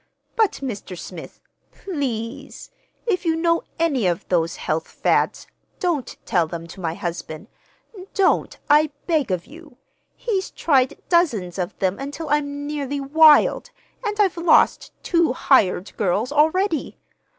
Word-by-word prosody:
But, 440 -4 +3
Mr. 200 -7 -5
Smith 170 0 -9 0.3
please, 260 - -5 0.3
if 390 -7 0
you 325 -2 +1
know 335 0 +1 0.2
any 280 - +1
of 175 -1 -2
those 165 -2 +1
health 160 +1 -2
fads, - - 0 0.3
don't 330 -8 -2
tell 175 -3 +1
them 165 0 -6
to 180 - -11
my 165 -1 -2
husband. 170 0 -5 0.7
Don't, 390 -1 +2
I 300 +1 +5 0.2
beg 310 -8 +1
of 180 -2 -2
you! 305 -4 -15 0.4
He's 395 -5 -2
tried 265 -5 +1
dozens 225 - +1
of 180 -1 -3
them 190 0 -1
until 290 +4 -6
I'm 285 -1 -1
nearly 285 -1 -3
wild, 300 +2 +5 0.3
and 420 -1 -3
I've 385 -4 +2
lost 335 +1 +3
two 335 -6 +2
hired 205 -8 +2
girls 210 +5 0
already. 315 +3 +1
285 Hz, 135 wpm, -22 LUFS, -, 0.7 s, I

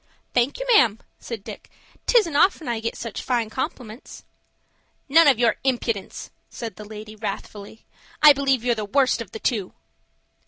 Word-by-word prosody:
"Thank 245 +3 +1
you, - - -4
ma'am," 225 - +5 0.2
said 225 -4 -7
Dick. - - -10 0.4
"'Tisn't 415 -11 +3
often 345 0 +3
I 235 -2 -1
get 230 +1 -4
such 230 -3 -6
fine 235 -4 -1
compliments." 250 -4 -6 0.8
"None 320 +3 +6
of 270 -5 +5
your 235 -1 +2
impudence," 235 -6 -2 0.2
said 230 -2 -7
the 210 - -10
lady, 215 0 -10
wrathfully. 210 0 -7 0.3
"I 300 -1 +9
believe 270 -3 0
you're 245 -1 +2
the 215 -2 -4
worst 255 +3 +1
of 225 - -8
the 220 - -8
two." 215 -5 -2
235 Hz, 160 wpm, -23 LUFS, 215-275 Hz, 0.8 s, I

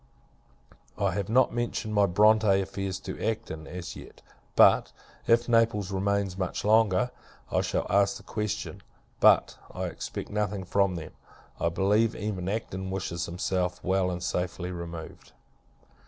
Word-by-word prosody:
I 100 -2 +1
have 100 +2 -3
not 125 +2 +4
mentioned 120 -2 -2
my 100 -1 +4
Bronte 105 +1 +4
affairs 95 -1 -3
to - - -6
Acton, 80 -8 -3
as 90 -1 -7
yet; - - -13 0.3
but, - - +6 0.4
if 115 +1 +4
Naples 115 -4 +2
remains 100 -1 -1
much 95 +1 -3
longer, 110 +2 +3 0.4
I - - +2
shall - - -1
ask 100 0 +2
the - - -15
question. 105 -1 -4 0.4
But, - - +4
I - - -5
expect - - -5
nothing 105 -2 -1
from 100 0 +1
them. 80 -2 -7 0.5
I 85 - +1
believe, 105 +6 +2
even 95 -3 -3
Acton 95 -3 -3
wishes 90 -2 -3
himself 90 +1 -1
well, 95 0 +1
and 90 -1 -4
safely 90 0 -2
removed. 85 -2 -8
100 Hz, 140 wpm, -28 LUFS, 90-105 Hz, 0.5 s, but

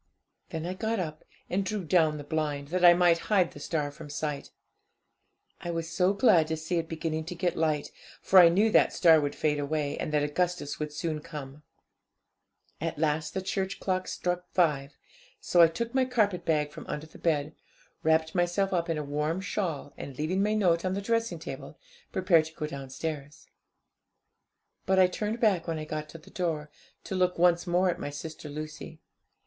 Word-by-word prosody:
'Then 160 0 -4
I 180 - -2
got 220 +3 -2
up, 155 -3 -4 0.2
and 195 +2 0
drew 200 0 -3
down 160 -2 +3
the 145 - -7
blind, 145 -2 -2
that 180 +2 -1
I 175 -1 +9
might 175 -1 +4
hide 190 -5 +3
the - - -11
star 150 -3 -2
from 150 +1 -11
sight. 145 -1 -4 1.1
I 175 - -6
was 165 -1 -3
so 180 +3 +3
glad 195 -6 +4
to 160 0 -2
see 160 +3 -2
it 165 - -5
beginning 160 -1 -2
to 180 - -6
get 175 -1 -1
light, 155 -2 0 0.3
for 190 - +6
I 170 -2 +9
knew 205 +6 +3
that - - +5
the - - -11
star 160 -3 +6
would 145 -1 -2
fade 150 -1 0
away, 145 0 -2
and - - -3
that 150 -1 +2
Augustus 170 0 -1
would 150 -1 -3
soon 155 0 -3
come. 150 -1 -9 1.2
'At 165 -1 -2
last 155 +1 0
the 190 - -2
church 195 0 -2
clock 185 -1 -1
struck 180 0 -2
five, 150 -6 +1 0.4
so 175 - +3
I 165 - +9
took 230 +9 -4
my 260 -1 +3
carpetbag 180 -11 +1
from 155 - -10
under 150 +1 -4
the 155 - -15
bed, 155 -2 0 0.5
wrapped 160 0 +2
myself 180 +2 +1
up 170 -1 0
in 165 - 0
a 150 - -2
warm 150 +4 -1
shawl, 175 -8 -3
and, 135 -2 -8
leaving 175 +6 0
my 210 +1 +1
note 175 -5 +2
on 185 0 -1
the 200 - -2
dressing 230 +2 0
table, - - -8 0.3
prepared 175 -4 +3
to 160 0 -11
go 155 - -3
downstairs. 140 +1 -6 1.4
But 190 0 +3
I 185 - +7
turned 210 +5 -2
back 200 -8 +2
when 165 -1 -1
I 155 - -5
got 155 0 -5
to 165 - -9
the 160 - -17
door, 155 -4 -2 0.3
to - - -6
look 180 -1 +1
once 175 0 +3
more 180 +1 +3
at - - -6
my - - -4
sister 155 +1 -7
Lucy. 155 +2 -7
165 Hz, 195 wpm, -28 LUFS, 150-185 Hz, 1.4 s, I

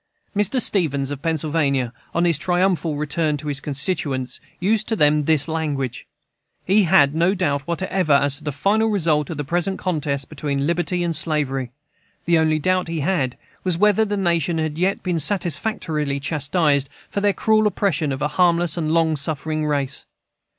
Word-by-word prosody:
Mr. 210 +6 +2
Stevens, 145 - 0
of 140 -1 -5
Pennsylvania, 150 -6 0 0.2
on 170 +1 +2
his 165 -4 +2
triumphal 175 -2 +1
return 150 0 -1
to 150 +1 -6
his 140 -1 -1
constituents, 140 -2 -2 0.2
used 215 +3 +1
to 225 - 0
them 150 -4 +3
this 155 -2 +3
language: 145 -6 -3 0.6
"He 200 +2 +4
had 145 -5 +4
no 170 +5 +2
doubt 145 -7 -1
whatever 180 -2 0
as 140 +1 +3
to - - -16
the 150 - -2
final 205 +10 +1
result 160 -8 +1
of 160 - -5
the 145 - -2
present 175 +6 -1
contest 145 -6 -2
between 140 -2 -2
liberty 175 +2 0
and 170 -1 0
slavery. 145 -5 0 0.6
The 170 -1 +3
only 155 -1 +2
doubt 185 +3 0
he 165 -2 -3
had 145 -6 0 0.3
was 180 -3 0
whether 210 +2 +4
the 205 -1 -2
nation 170 -3 0
had 155 0 -2
yet 190 +2 0
been 180 -3 -1
satisfactorily 160 -4 -1
chastised 145 0 +1 0.2
for 200 - -2
their 205 0 +3
cruel 215 +1 +2
oppression 170 -8 0
of 135 - -3
a - - +2
harmless 170 +1 +2
and 155 -2 -1
long 160 -1 +2
suffering 155 +1 -2
race." 140 -2 -1
160 Hz, 170 wpm, -21 LUFS, 145-180 Hz, 0.6 s, He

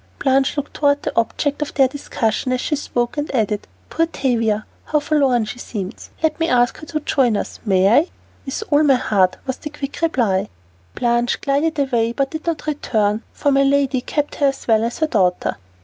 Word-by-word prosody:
Blanche 270 +1 +2
looked 285 - -3
toward 285 -1 +2
the - - -3
object 280 +6 0
of 300 - -3 0.2
discussion 255 -3 -1
as 255 - +1
she 300 - -1
spoke, 240 -3 -2
and 290 +1 -2
added, 210 -3 0 0.2
"Poor 330 0 +1
Tavia, 230 -8 0 0.2
how 300 - +1
forlorn 275 -6 +2
she 245 +3 -7
seems. 205 -4 -6
Let 320 - +1
me 330 0 +1
ask 245 -1 +2
her 310 - -10
to 305 -1 -3
join 250 -7 +2
us, - - -5
may 190 -2 +3
I?" 285 - +5 0.4
"With 270 +10 -4
all 290 +1 +5
my 285 -3 +5
heart" 190 -6 +2
was 260 -1 -3
the 300 - -7
quick 285 0 -6
reply. 230 - +1 0.5
Blanche 240 0 +1
glided 295 +3 0
away 240 -5 +1
but 275 +1 -1
did 315 +1 -6
not 330 -2 -2
return, 220 -8 0
for 285 - 0
my 275 0 +4
lady 275 -1 +2
kept 295 +3 -2
her 285 - +3
as 275 - -3
well 220 -1 +4
as 235 +1 -2
her 315 - +1
daughter. 185 -9 +1
270 Hz, 195 wpm, -20 LUFS, 230-290 Hz, 0.5 s, I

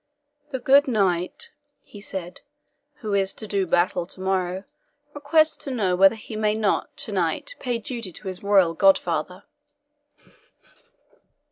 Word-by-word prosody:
"The 270 - -3
good 275 +3 +5
knight," 200 - 0 0.3
he 205 - -12
said, 185 -3 -6 0.6
"who 215 -3 -3
is 195 -1 +1
to - - -6
do 200 -2 -1
battle 175 +1 +1
tomorrow 185 0 -2 0.5
requests 310 +2 +3
to - - -4
know 205 -8 0
whether 195 +4 +6
he 220 0 -9
may 215 0 +1
not 215 -2 -1
to - - -7
night - - -1
pay 245 -3 -2
duty 230 -3 -6
to 200 - -7
his 185 -1 -5
royal 195 -4 +4
godfather!" 180 -1 +2
200 Hz, 135 wpm, -24 LUFS, 185-235 Hz, 0.6 s, whether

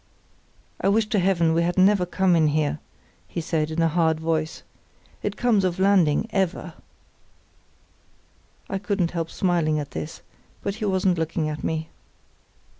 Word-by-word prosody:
"I 195 - +2
wish 215 +2 +3
to 215 - +2
Heaven 175 -3 +2
we 165 - +2
had 175 +1 -1
never 190 -1 +4
come 185 0 +2
in 160 -2 +4
here," 150 0 0 0.5
he - - -5
said, 160 -2 -1
in 160 +1 0
a - - +4
hard 160 -1 +1
voice; 160 0 -2 0.6
"it - - -3
comes 230 -5 +2
of 180 -2 0
landing 190 -4 +3
ever." 190 -3 -1 1.9
(I 195 - -3
couldn't 200 -4 -1
help 165 -2 -3
smiling 170 -5 +1
at 145 -2 -4
this, 155 - -6 0.4
but 200 - -1
he - - 0
wasn't 190 -3 +1
looking 160 -1 -1
at 150 -1 -6
me.) 160 0 -3
170 Hz, 155 wpm, -24 LUFS, 160-190 Hz, 1.9 s, never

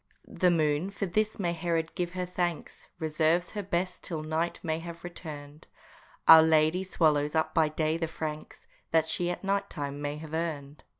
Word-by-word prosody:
The 180 - +2
moon 155 +1 +1
for 200 0 -3
this 215 +4 0
may 175 -4 -1
Herod 165 -1 -1
give 175 0 -3
her 180 0 -2
thanks! 175 -2 -3
Reserves 160 +2 +1
her 210 - -3
best 180 -1 -2
till 160 -3 -4
night 160 +2 -1
may 160 -2 -1
have 170 0 -9
returned; 150 -4 -9 0.6
Our 160 0 +11
lady 160 +3 +3
swallows 150 -5 +1
up 160 0 +1
by 160 -2 +3
day 155 +1 0
the 165 -1 -2
francs 155 -1 -6 0.2
That 160 -1 +3
she 175 +2 0
at 175 - -4
night 200 +1 0
time 145 -2 -5
may 145 0 -3
have 155 0 -9
earned. 155 -3 -4
160 Hz, 180 wpm, -29 LUFS, 155-175 Hz, 0.6 s, Our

